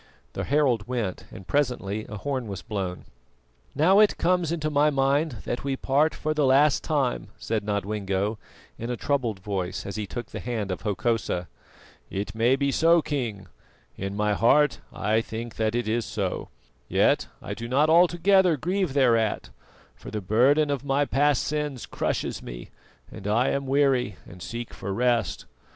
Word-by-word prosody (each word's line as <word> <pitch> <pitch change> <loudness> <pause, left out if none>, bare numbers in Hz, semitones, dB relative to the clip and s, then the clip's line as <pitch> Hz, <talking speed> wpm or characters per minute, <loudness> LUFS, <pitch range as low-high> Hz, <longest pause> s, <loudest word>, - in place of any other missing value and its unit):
The - - -3
herald 130 -7 +2
went, 120 -7 -3
and 95 - -10
presently 110 -7 -1
a 105 - -6
horn 130 0 -3
was 100 -3 -6
blown. 95 -4 -4 0.7
"Now 180 +8 +5
it 215 -1 +5
comes 175 -2 +1
into 155 -2 -1
my 150 +1 +4
mind 140 +2 +1
that 120 - -3
we 135 -1 -1
part 145 +4 +1
for 155 0 -1
the 155 -1 +1
last 140 +2 +4
time," 140 -6 0
said 110 -2 -2
Nodwengo 100 0 -2 0.4
in 115 - -4
a 125 - -2
troubled 120 -9 -1
voice 95 -2 -3
as 100 - -5
he 105 -2 -3
took 120 +2 -6
the - - -5
hand 110 -5 -3
of 90 - -4
Hokosa. 105 -4 -1 0.6
"It 100 +2 -4
may 115 +4 +3
be 140 0 0
so, 165 +2 +4
King; 115 -9 -3 0.5
in 100 +1 -5
my 105 0 +1
heart 145 +8 +3
I 110 +2 +1
think 115 +1 -7
that 110 0 0
it 120 -2 -1
is 115 +2 0
so; 100 -5 -3 0.4
yet - - +2
I - - -6
do 115 - -6
not 140 +5 +3
altogether 175 +1 +4
grieve 180 -1 -1
thereat, 115 -5 +2 0.4
for - - -11
the 105 - -3
burden 130 +10 +3
of 140 -2 -2
my 140 +1 +1
past 145 -1 +2
sins 150 -4 -3
crushes - - -2
me, - - -9 0.4
and 100 - -8
I 115 +5 +2
am 140 -1 -1
weary 135 -6 +2
and 90 0 -13
seek 115 +4 -6
for 100 - -5
rest. 120 -1 0
125 Hz, 170 wpm, -26 LUFS, 105-145 Hz, 0.7 s, Now